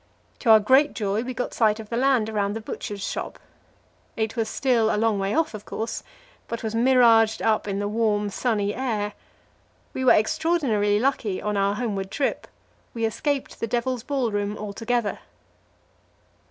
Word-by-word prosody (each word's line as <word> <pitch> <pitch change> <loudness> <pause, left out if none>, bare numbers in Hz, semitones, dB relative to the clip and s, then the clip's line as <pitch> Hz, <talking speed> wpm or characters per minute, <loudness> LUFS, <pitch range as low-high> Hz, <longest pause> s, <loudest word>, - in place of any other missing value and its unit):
To 240 - -1
our 220 -1 +9
great 265 +8 +4
joy, 205 -1 -1
we 250 +1 -5
got 250 - -3
sight 220 -2 +2
of 215 -1 -9
the 230 - -3
land 255 -3 +2
around 205 -2 -1
the - - -3
Butcher's 205 -2 -6
Shop. - - -4 0.8
It 220 +1 -1
was 225 -2 -1
still 235 -4 +2
a - - 0
long 220 -2 +1
way 195 +4 -1
off, 325 -4 +1
of 210 -1 -7
course, 225 +2 -4 0.5
but 230 0 -5
was 220 -1 -3
miraged 230 -2 +4
up 220 -1 +1
in 195 -1 -2
the 205 0 -1
warm, 210 -1 0
sunny 205 -2 0
air. 215 -5 -2 0.8
We 260 - -3
were 255 - +7
extraordinarily 220 -5 +1
lucky 225 -6 0
on 210 0 -2
our 200 0 +1
homeward 200 -5 -3
trip; 275 +6 -2 0.5
we 230 -1 0
escaped 275 +5 -2
the 230 - -2
Devil's 245 +1 -1
Ballroom 215 -6 -2
altogether. 220 +2 -2
220 Hz, 165 wpm, -24 LUFS, 210-245 Hz, 0.8 s, our